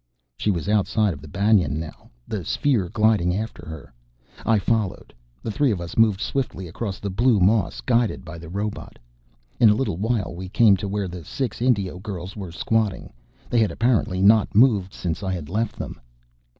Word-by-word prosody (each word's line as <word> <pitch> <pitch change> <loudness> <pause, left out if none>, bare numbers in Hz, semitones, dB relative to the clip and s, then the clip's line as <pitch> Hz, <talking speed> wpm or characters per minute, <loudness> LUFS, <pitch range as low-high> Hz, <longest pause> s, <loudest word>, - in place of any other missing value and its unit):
She 105 - -1
was 90 -3 -1
outside 105 -1 +2
of 70 - -11
the 80 - -11
banyan 90 -4 +2
now, 80 -1 -9 0.2
the 105 -4 -3
sphere 120 - 0
gliding 105 -5 +2
after 105 -4 -5
her. 80 -3 -9 0.5
I 115 -1 +4
followed. 105 -1 -1 0.3
The 110 - -3
three 140 +6 +2
of 100 -6 0
us 85 0 -7
moved 110 -4 +4
swiftly 125 -9 -3
across 95 +4 -5
the 100 - -4
blue 115 +2 +3
moss, 100 +1 +2
guided 120 -6 +1
by 85 0 -8
the 85 -1 -10
robot. 100 +3 -5 0.6
In 115 - +7
a 105 - +4
little 120 -8 -1
while 110 -2 -1
we 90 +1 -7
came 105 0 +5
to 100 +1 -4
where 100 -1 -2
the 90 -1 -8
six 125 - -4
Indio 100 -8 +1
girls 95 -2 -6
were 95 -5 -6
squatting. 110 - -1 0.3
They 120 - +1
had 110 -2 +3
apparently 110 -6 +1
not 105 +1 +4
moved 105 -5 +4
since 85 -2 -4
I 95 -2 -2
had 80 -5 -5
left 110 +4 -1
them. - - -7
100 Hz, 190 wpm, -23 LUFS, 90-110 Hz, 0.6 s, In